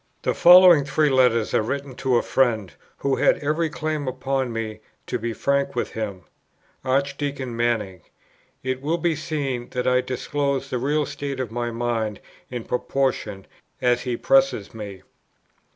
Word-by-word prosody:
The -, -, +1 dB
following 175 Hz, -3 st, +8 dB
three 150 Hz, +1 st, +1 dB
letters 125 Hz, -4 st, +3 dB
are -, -, +3 dB
written 140 Hz, +4 st, -4 dB
to 130 Hz, -2 st, +1 dB
a -, -, +1 dB
friend, 110 Hz, -8 st, +1 dB, 0.2 s
who 140 Hz, -1 st, 0 dB
had -, -, +4 dB
every 155 Hz, +3 st, 0 dB
claim 155 Hz, -2 st, -3 dB
upon 130 Hz, 0 st, -1 dB
me 110 Hz, -1 st, -4 dB, 0.3 s
to 125 Hz, -, -3 dB
be 115 Hz, +1 st, -3 dB
frank 140 Hz, +3 st, 0 dB
with 120 Hz, -, -2 dB
him, 100 Hz, -5 st, -5 dB, 0.6 s
Archdeacon 140 Hz, -1 st, -1 dB
Manning: 115 Hz, -6 st, -1 dB, 0.6 s
it 130 Hz, 0 st, -2 dB
will 155 Hz, +4 st, 0 dB
be 170 Hz, -1 st, 0 dB
seen 140 Hz, -6 st, -3 dB
that 125 Hz, -, -2 dB
I 125 Hz, 0 st, +4 dB
disclose 140 Hz, +1 st, -2 dB
the 125 Hz, -, -1 dB
real 145 Hz, +4 st, +1 dB
state 140 Hz, -2 st, -5 dB
of 125 Hz, -4 st, -3 dB
my 120 Hz, 0 st, -2 dB
mind 115 Hz, -3 st, -2 dB, 0.3 s
in 125 Hz, -2 st, -5 dB
proportion 125 Hz, -6 st, -2 dB, 0.3 s
as 125 Hz, -1 st, +2 dB
he 125 Hz, -2 st, -2 dB
presses 270 Hz, -, +2 dB
me. 100 Hz, -4 st, -8 dB
130 Hz, 155 wpm, -23 LUFS, 115-140 Hz, 0.6 s, following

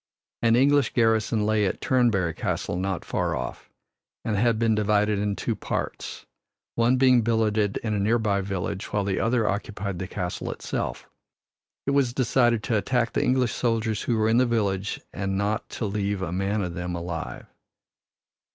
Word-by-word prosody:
An 115 Hz, -1 st, +4 dB
English 140 Hz, +2 st, +3 dB
garrison 110 Hz, -2 st, +2 dB
lay 110 Hz, 0 st, +2 dB
at -, -, -3 dB
Turnberry 110 Hz, -10 st, +2 dB
Castle -, -, -2 dB
not 95 Hz, 0 st, -2 dB
far -, -, -1 dB
off, 65 Hz, -, -6 dB, 0.6 s
and 110 Hz, -, 0 dB
had 115 Hz, +2 st, +2 dB
been 115 Hz, 0 st, +2 dB
divided 105 Hz, -1 st, +2 dB
in 100 Hz, 0 st, 0 dB
two -, -, -2 dB
parts, -, -, -4 dB, 0.5 s
one 120 Hz, +2 st, +3 dB
being 130 Hz, -2 st, +5 dB
billeted 110 Hz, -2 st, +1 dB
in 110 Hz, -2 st, -1 dB
a 105 Hz, -, 0 dB
nearby 105 Hz, -1 st, +2 dB
village, 95 Hz, 0 st, -3 dB
while 105 Hz, -1 st, +1 dB
the 100 Hz, -1 st, -1 dB
other 115 Hz, -1 st, +1 dB
occupied 100 Hz, -2 st, -3 dB
the 95 Hz, -, -4 dB
castle 90 Hz, -1 st, -4 dB
itself. -, -, -4 dB, 0.8 s
It 140 Hz, -, +1 dB
was 140 Hz, -4 st, +2 dB
decided 120 Hz, -3 st, +2 dB
to 110 Hz, +1 st, +1 dB
attack 125 Hz, +1 st, 0 dB
the -, -, +1 dB
English 125 Hz, -2 st, +2 dB
soldiers 115 Hz, -3 st, 0 dB
who 120 Hz, -, 0 dB
were 110 Hz, 0 st, +2 dB
in 115 Hz, +1 st, +3 dB
the 125 Hz, 0 st, +4 dB
village 100 Hz, -4 st, -1 dB
and 95 Hz, -1 st, -2 dB
not 105 Hz, +2 st, -1 dB
to 115 Hz, -, -4 dB
leave 100 Hz, -1 st, -1 dB
a 85 Hz, -, -3 dB
man 100 Hz, +3 st, 0 dB
of 90 Hz, -2 st, -4 dB
them 90 Hz, +1 st, -4 dB
alive. 85 Hz, -7 st, -5 dB
105 Hz, 170 wpm, -25 LUFS, 100-115 Hz, 0.8 s, being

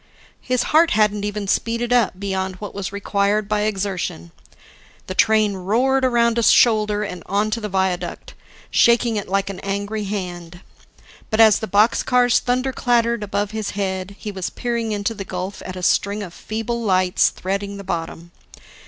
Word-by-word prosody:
His 255 Hz, -1 st, 0 dB
heart 325 Hz, +2 st, +6 dB
hadn't 210 Hz, -1 st, +2 dB
even 205 Hz, -1 st, -4 dB
speeded 235 Hz, +4 st, 0 dB
up 225 Hz, -6 st, +2 dB
beyond 190 Hz, -1 st, -2 dB
what 205 Hz, +2 st, -8 dB
was 195 Hz, -1 st, -4 dB
required 200 Hz, +1 st, 0 dB
by 210 Hz, 0 st, 0 dB
exertion. 190 Hz, -, -3 dB, 0.7 s
The 185 Hz, -, -5 dB
train 215 Hz, 0 st, +3 dB
roared 240 Hz, +8 st, +1 dB
around 235 Hz, -2 st, +2 dB
a -, -, +2 dB
shoulder 215 Hz, -2 st, +4 dB
and 180 Hz, -4 st, -6 dB
onto 215 Hz, +3 st, 0 dB
the 210 Hz, -, -4 dB
viaduct, 185 Hz, -2 st, -2 dB, 0.4 s
shaking 235 Hz, -1 st, +4 dB
it 205 Hz, -, -3 dB
like 195 Hz, +1 st, 0 dB
an 190 Hz, -, -8 dB
angry 205 Hz, +2 st, -3 dB
hand. 175 Hz, -3 st, -6 dB, 0.7 s
But 215 Hz, -, -1 dB
as 220 Hz, -2 st, +7 dB
the 220 Hz, -, -4 dB
boxcars 240 Hz, +4 st, +3 dB
thunder 255 Hz, +2 st, -1 dB
clattered 235 Hz, -2 st, +1 dB
above 205 Hz, 0 st, -2 dB
his 215 Hz, -2 st, -3 dB
head, 190 Hz, 0 st, -3 dB
he 210 Hz, -, -6 dB
was 190 Hz, -3 st, -4 dB
peering 235 Hz, -2 st, -3 dB
into 205 Hz, +2 st, -1 dB
the 200 Hz, -2 st, -6 dB
gulf 185 Hz, +1 st, -5 dB
at 185 Hz, -, -6 dB
a 185 Hz, -, -7 dB
string 200 Hz, +3 st, +1 dB
of 175 Hz, -4 st, -9 dB
feeble 225 Hz, +4 st, -4 dB
lights 185 Hz, -4 st, +2 dB
threading 200 Hz, +2 st, -4 dB
the 200 Hz, -, -8 dB
bottom. 170 Hz, -2 st, -5 dB
205 Hz, 165 wpm, -21 LUFS, 190-225 Hz, 0.7 s, as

